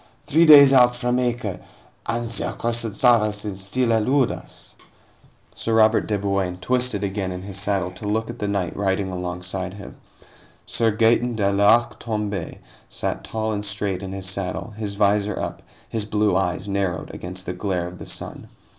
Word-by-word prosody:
"Three 165 +3 +4
days 140 -3 +10
out 125 -2 +6
from 125 +1 0
Acre, 120 -6 -1 0.5
and 120 +1 -1
the 115 - -2
accursed 115 -2 -2
Saracens 105 -4 +2
still 120 +4 +1
elude 125 +4 +2
us." - - -10 0.8
Sir 115 - -1
Robert 110 0 +4
de 105 - 0
Bouain 100 -2 -1
twisted 125 0 -1
again 95 -1 -2
in 90 0 -6
his 100 0 -5
saddle 95 -2 -1
to 105 +3 -8
look 110 +2 0
at 120 0 -8
the 105 - -2
knight 100 -3 -2
riding 95 -1 -1
alongside 90 +1 -4
him. 100 -1 -10 0.7
Sir 115 - +1
Gaeton 115 +2 +2
de 100 -2 +1
l'Arc 100 +4 +3
Tomb├® 105 -6 -3 0.3
sat - - -3
tall 110 0 -2
and 105 0 -3
straight 100 -2 -2
in 95 -1 -6
his 95 -1 -5
saddle, 95 +3 -4
his 105 -2 -4
visor 105 0 +1
up, - - -4 0.3
his 110 -2 -3
blue 105 -2 +1
eyes 95 0 -1
narrowed 95 -4 -2
against 90 +1 -7
the 90 - -3
glare 90 -1 -2
of 90 0 -9
the - - -9
sun. - - -6
105 Hz, 170 wpm, -23 LUFS, 95-115 Hz, 0.8 s, days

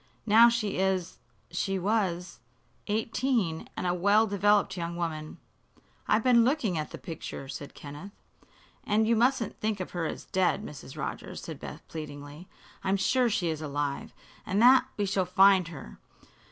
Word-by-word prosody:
Now 230 +2 +7
she 220 -5 -1
is 190 -2 0 0.3
she 195 +2 -1
was 185 -3 -1 0.5
eighteen, 220 -4 -1
and - - -3
a 175 - +2
well 200 +5 +4
developed 205 0 +2
young 170 -1 -4
woman." 155 -3 -4 0.7
"I've 220 - +3
been 245 -2 +5
looking 245 - +1
at 155 -1 -3
the - - -8
picture," 160 -5 -7
said 140 +1 -8
Kenneth. 150 +7 -9 0.7
"And 215 +1 +2
you 230 - +4
mustn't 235 -1 +1
think 215 -2 -1
of 185 - -5
her 170 -2 -2
as - - -6
dead, 190 +3 0
Mrs. 140 -5 -10
Rogers," - - -5
said - - -7
Beth, - - -9
pleadingly. 150 +1 -8 0.4
"I'm 195 +1 +1
sure 245 +5 +2
she 180 -5 0
is 160 -1 -3
alive, 145 -1 -3 0.3
and 195 - -1
that 255 +3 +7
we 205 - 0
shall 195 -1 +1
find 190 0 +5
her. 165 -4 -10
190 Hz, 160 wpm, -28 LUFS, 165-220 Hz, 0.7 s, Now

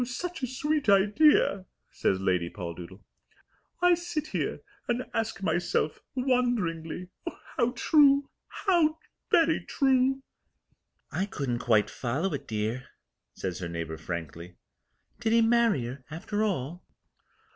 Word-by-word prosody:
"Such 305 +8 -5
a 255 - -1
sweet 295 +1 -1
idea," 200 -1 +4 0.2
says 95 - 0
Lady 90 -3 +1
Poldoodle. 90 +1 -8 0.8
"I 355 0 +7
sit 340 -3 -2
here - - -2 0.3
and 245 +1 -1
ask 225 -3 -2
myself 175 -4 0
wonderingly! 215 - 0 0.5
How 235 - +2
true! 280 0 +5 0.2
How 330 -5 +2 0.3
very 330 -2 +3
true!" 265 0 +2 0.9
"I 190 +2 -1
couldn't 130 -10 -2
quite 110 -4 +2
follow 140 +10 -2
it, 140 - -5
dear," 110 +3 -2 0.5
says 90 -3 -4
her 90 -2 -4
neighbour 85 -1 -4
frankly. 85 +1 -6 0.6
"Did 225 -2 +1
he 230 0 +5
marry 225 - +3
her 130 +2 -7
after 205 +7 -2
all?" 175 -4 -2
195 Hz, 120 wpm, -28 LUFS, -, 0.9 s, I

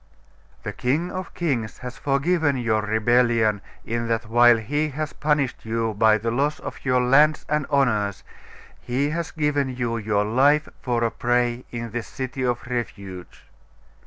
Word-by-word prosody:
'The - - -4
King 150 +8 -1
of 185 0 -5
kings 130 - -2
has 125 0 -8
forgiven 145 +1 +1
your 115 -3 +1
rebellion, 110 -1 +2 0.2
in 115 0 -2
that 115 -1 -1
while 120 +1 +6
He 145 +8 -1
has 150 +1 -4
punished 150 -3 0
you 115 0 -1
by 110 +1 +4
the 115 +2 -2
loss 140 +5 0
of - - -8
your 125 -2 +2
lands 150 +5 +4
and 150 -1 0
honours, 110 -9 +1 0.6
He 140 +4 -1
has 165 +1 -3
given 150 -3 0
you 120 -2 -2
your 105 -2 0
life 140 +7 +3
for 120 -2 0
a 115 - +1
prey 120 0 0
in 115 -1 -6
this 120 0 -4
city 130 0 -5
of 120 -1 -1
refuge. 100 -7 -6
125 Hz, 160 wpm, -23 LUFS, 115-145 Hz, 0.6 s, while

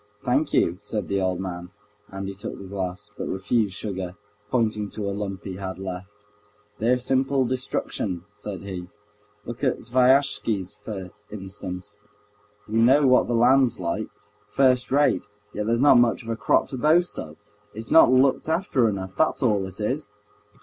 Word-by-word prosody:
"Thank 140 +5 +1
you," 85 +1 +2
said 105 0 -4
the 100 0 0
old 95 -1 0
man, 90 -2 -5 0.4
and 95 0 -6
he 100 - -5
took 95 - -7
the - - -9
glass, 95 +1 -5
but - - -5
refused 100 +1 0
sugar, 95 -4 -4 0.3
pointing 110 -4 0
to 105 -1 -4
a 100 - -1
lump 100 -2 -5
he 95 -2 -6
had 95 -1 -5
left. 95 0 -6 0.7
"They're 120 +3 +3
simple 130 +1 +1
destruction," 115 -7 -3
said 105 -1 -7
he. 95 -3 -6 0.6
"Look 120 +4 -7
at 130 - +2
Sviazhsky's, 120 -6 +2
for 95 -4 -7 0.2
instance. 95 0 -7 0.7
We 110 +1 0
know 135 +5 +5
what 130 -1 +5
the 120 - 0
land's 125 0 +4
like—first 125 +8 -1
rate, 145 -5 +2 0.3
yet 105 0 -3
there's 115 +1 +2
not 135 -3 +7
much 120 -1 +2
of 115 - -9
a 115 - 0
crop 105 -2 +2
to 130 - -5
boast 165 +6 +3
of. 80 0 -8 0.4
It's 110 +1 -5
not 160 - +7
looked 130 +4 +3
after 160 - +2
enough—that's 100 +10 -1
all 105 -5 +2
it 95 +2 -11
is!" 125 +4 -2
105 Hz, 165 wpm, -24 LUFS, 95-125 Hz, 0.7 s, not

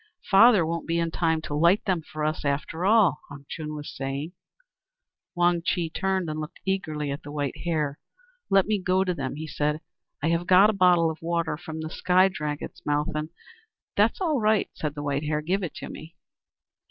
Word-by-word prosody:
"Father 205 -2 +7
won't 165 +1 -3
be 165 0 0
in 165 -1 0
time 160 -2 +1
to 145 - -5
light 170 +7 +3
them 185 -5 0
for 155 0 -6
us, 155 +1 -1
after 150 +5 -1
all," 205 -8 +4
Han 140 0 -11
Chung 155 -1 -6
was 150 -1 -7
saying. 135 +4 -4 1.0
Wang 175 -1 +2
Chih 170 -2 -1
turned, 190 -1 -1
and 155 0 -3
looked 155 +3 -7
eagerly 155 -7 -2
at 140 - -5
the 145 - -9
White 145 -3 -3
Hare. 150 -4 -1 0.5
"Let 195 -1 +4
me 210 -2 0
go 185 +1 +2
to 185 -1 -1
them," 135 -4 -4
he 155 +2 -5
said. 150 0 -1 0.4
"I 160 - +2
have 170 +1 0
got 190 +3 +7
a - - -6
bottle 180 -4 +4
of 160 - -10
water 170 -1 -1
from 160 0 -7
the 160 - -4
Sky 185 +2 +3
Dragon's 150 -5 -5
mouth, 145 0 0
and 155 +1 -3 0.3
" 440 0 -47
"That's - - +3
all 320 -7 +1
right," 215 -1 +2
said 150 -1 -4
the 145 - -5
White 145 +1 -1
Hare. 150 0 0
"Give 190 +5 0
it 180 - -5
to - - -7
me." 160 +2 -10
165 Hz, 205 wpm, -26 LUFS, 150-185 Hz, 1.0 s, Father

